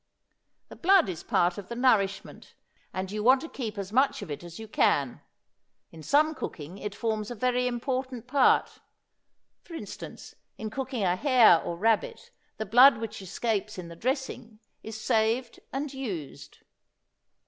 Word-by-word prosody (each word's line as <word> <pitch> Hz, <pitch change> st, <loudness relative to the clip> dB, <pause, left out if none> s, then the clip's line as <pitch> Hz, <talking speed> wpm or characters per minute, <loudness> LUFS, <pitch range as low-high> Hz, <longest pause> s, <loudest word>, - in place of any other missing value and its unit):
The -, -, -10 dB
blood 375 Hz, -, +4 dB
is 170 Hz, -3 st, -5 dB
a -, -, -20 dB
part 175 Hz, +2 st, +1 dB
of 195 Hz, -, -11 dB
the 235 Hz, -, -5 dB
nourishment, 220 Hz, -6 st, 0 dB, 0.4 s
and 185 Hz, 0 st, -4 dB
you 210 Hz, 0 st, -3 dB
want 260 Hz, +3 st, +6 dB
to 325 Hz, -, -6 dB
keep 225 Hz, -9 st, -6 dB
as 200 Hz, -1 st, -5 dB
much 260 Hz, -3 st, +2 dB
of 170 Hz, -, -8 dB
it 145 Hz, -, -6 dB
as 170 Hz, -1 st, -10 dB
you 220 Hz, -, -8 dB
can; 140 Hz, -, +1 dB, 0.7 s
in 160 Hz, -, -12 dB
some 300 Hz, -, +3 dB
cooking 175 Hz, -, -7 dB
it 205 Hz, -1 st, -5 dB
forms 215 Hz, -1 st, -2 dB
a 245 Hz, -, -5 dB
very 250 Hz, +2 st, +1 dB
important 255 Hz, 0 st, -3 dB
part; 265 Hz, +1 st, +2 dB, 0.8 s
for 335 Hz, -, -11 dB
instance, 210 Hz, -10 st, -9 dB, 0.2 s
in 215 Hz, -1 st, -5 dB
cooking 260 Hz, -2 st, -3 dB
a 180 Hz, -1 st, +2 dB
hare 240 Hz, -, +5 dB
or 170 Hz, -, -5 dB
rabbit, 220 Hz, +3 st, 0 dB, 0.3 s
the 220 Hz, -, -3 dB
blood 245 Hz, +5 st, +7 dB
which 220 Hz, -2 st, -6 dB
escapes 215 Hz, +2 st, -2 dB
in 175 Hz, -2 st, -7 dB
the 170 Hz, -, -10 dB
dressing 250 Hz, -, -3 dB, 0.2 s
is 220 Hz, 0 st, -8 dB
saved 225 Hz, +3 st, 0 dB
and 280 Hz, +1 st, -4 dB
used. 195 Hz, -, -7 dB
225 Hz, 165 wpm, -27 LUFS, 195-255 Hz, 0.8 s, blood